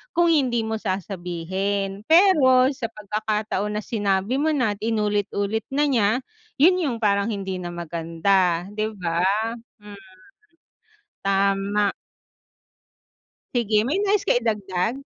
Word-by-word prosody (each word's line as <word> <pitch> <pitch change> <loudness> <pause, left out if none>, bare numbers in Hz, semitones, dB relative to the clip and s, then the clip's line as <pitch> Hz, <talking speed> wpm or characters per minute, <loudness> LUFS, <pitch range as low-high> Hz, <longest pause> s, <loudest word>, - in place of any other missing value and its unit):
kung 340 0 +4
hindi 250 -6 +1
mo 220 0 -3
sasabihin. 195 +1 -3
Pero 290 -8 +5
sa 265 -4 -4
pagkakataon 210 0 -3
na 210 - -4
sinabi 205 +3 0
mo 315 - +2
na 250 -6 +1
at 200 - -14
inulit-ulit 210 -1 -1
na 280 +2 +1
niya, 235 -8 +2 0.5
yun 360 +6 +5
yung 270 -8 -1
parang 200 0 +2
hindi 195 -3 -4
na 175 - -5
maganda, 170 +1 0
di 215 +1 -2
ba? 180 -6 -3 0.6
Hmm. 210 0 -11 1.3
Tama. 195 +1 +1 1.6
Sige, 220 -2 +2
may 350 +10 0
nais 410 -1 +1
ka - - +3
idagdag? 220 +1 -1
210 Hz, 120 wpm, -23 LUFS, 195-245 Hz, 1.6 s, Pero